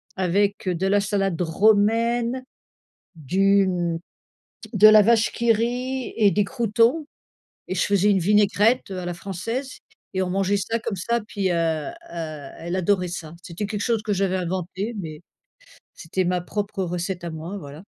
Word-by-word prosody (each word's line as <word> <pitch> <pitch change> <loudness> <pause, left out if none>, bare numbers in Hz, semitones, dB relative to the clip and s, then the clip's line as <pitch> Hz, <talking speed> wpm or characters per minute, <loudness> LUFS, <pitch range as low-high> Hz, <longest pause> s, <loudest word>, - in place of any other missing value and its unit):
avec 195 +2 0
de 180 +2 0
la 205 +1 +3
salade 195 -3 -1
romaine, 225 +7 +2 0.7
du, 195 +6 +2
hem 175 -3 -1 0.8
de 215 - +8
la 215 0 +8
Vache 225 +1 +3
qui 235 0 +2
rit 250 +3 -2
et 210 -3 +5
des 205 - +2
croûtons 235 +7 +1 0.6
et - - -2
je 185 - +1
faisais 200 0 +3
une 195 - +3
vinaigrette 210 +5 +3
à 185 -1 -4
la 175 - -3
française 200 +9 -5 0.4
et 190 - +1
on 180 - -2
mangeait 195 +1 +1
ça 225 +3 -1
comme 220 -2 -4
ça 235 +6 -1
puis, 205 -3 -2
heu - - +1
heu, 165 - -1 0.2
elle 160 +1 -6
adorait 185 0 +1
ça. 165 -2 -7
C'était 180 +4 -5
quelque 205 0 -4
chose 230 -2 0
que 210 -2 -1
j'avais 190 -1 0
inventé, 185 +4 -3
mais 155 -5 -6 0.7
c'était 185 +3 -3
ma 180 0 0
propre 200 +2 -4
recette 175 +1 -3
à - - -3
moi, 165 +5 -6
voilà. 150 -1 -10
195 Hz, 165 wpm, -23 LUFS, 175-215 Hz, 0.8 s, de